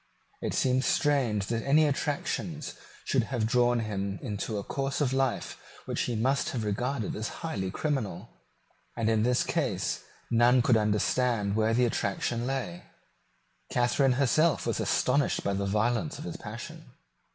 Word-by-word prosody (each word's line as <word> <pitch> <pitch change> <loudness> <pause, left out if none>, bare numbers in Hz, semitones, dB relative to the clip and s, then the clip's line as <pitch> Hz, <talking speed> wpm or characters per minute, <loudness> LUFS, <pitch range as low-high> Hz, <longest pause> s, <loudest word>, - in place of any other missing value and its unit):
It - - -2
seems 130 0 +2
strange 125 -9 +2
that 115 +2 -2
any 150 +3 +4
attractions 150 +2 -2 0.3
should 130 -4 +2
have 120 -2 -1
drawn 120 +1 +3
him 100 -2 -3
into 105 +1 -3
a 100 - -3
course 135 +4 -2
of 135 -3 +1
life 135 0 -1 0.3
which - - -2
he 120 - -2
must 130 +5 +1
have 120 -4 -2
regarded 115 +3 -2
as 110 +9 -5
highly 95 -12 -2
criminal; 115 - -2 0.7
and 115 -1 +1
in 110 -1 +2
this 125 +2 +2
case - - -1 0.3
none 120 +1 +5
could 120 - +4
understand 105 0 +1
where 110 +1 +2
the 125 +1 +4
attraction 120 +2 -1
lay. 125 -11 -3 0.9
Catharine 125 +2 +3
herself 145 +5 +2
was - - -1
astonished 140 +3 +1
by 100 - 0
the 100 0 -1
violence 110 +4 0
of - - -8
his - - -5
passion. - - -8
120 Hz, 150 wpm, -29 LUFS, 105-135 Hz, 0.9 s, none